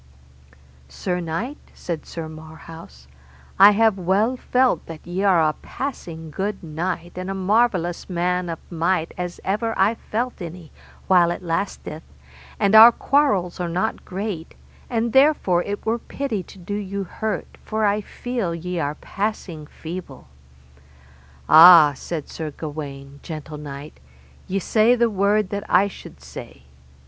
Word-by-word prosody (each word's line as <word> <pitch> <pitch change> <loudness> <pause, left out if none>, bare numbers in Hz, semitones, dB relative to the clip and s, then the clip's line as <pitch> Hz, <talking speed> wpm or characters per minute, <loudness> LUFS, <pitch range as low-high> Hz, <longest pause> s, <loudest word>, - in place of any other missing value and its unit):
Sir 180 - -3
knight, 175 - -4 0.2
said 170 -3 -5
Sir 165 -1 -6
Marhaus, 155 - -12 0.5
I 200 +2 +9
have 220 -2 +3
well 200 +7 +1
felt 250 -7 +1
that 165 -2 -9
ye 175 +2 -3
are 175 -5 +4
a 155 - 0
passing 165 - -7
good 195 +5 -3
knight 170 +2 -4
and 185 +1 -5
a 195 - -3
marvellous 190 -3 +1
man 180 0 -1
of 165 - -3
might 170 0 0
as 180 0 -5
ever 220 +3 -1
I 195 +4 +4
felt 235 0 -4
any, 170 -1 -8 0.3
while 180 -3 +5
it 175 - -4
lasteth, 165 -2 -3 0.6
and 200 - +2
our 225 +2 +11
quarrels 235 -11 +1
are 175 -1 -2
not 175 +2 -2
great, 190 -3 -5 0.3
and 230 -1 -1
therefore 265 - +4
it 205 +2 -5
were 225 +2 0
pity 250 -5 -3
to 190 - -14
do 185 +2 -7
you 200 -1 -3
hurt, 215 +4 -4
for 220 0 -1
I 205 +1 +2
feel 225 -5 -4
ye 180 +1 -4
are 145 -1 -2
passing 190 -7 -4
feeble. 160 - -9 1.2
Ah, 160 -2 +9
said 155 +1 -5
Sir 160 -2 -5
Gawaine, 140 -2 -8
gentle 155 -2 -7
knight, 145 0 -9 0.5
ye 195 - -1
say 220 +5 +3
the 235 -1 +2
word 200 0 +1
that 200 -1 -3
I 200 - +4
should 200 - -12
say. 65 0 -10
180 Hz, 145 wpm, -22 LUFS, 165-210 Hz, 1.2 s, our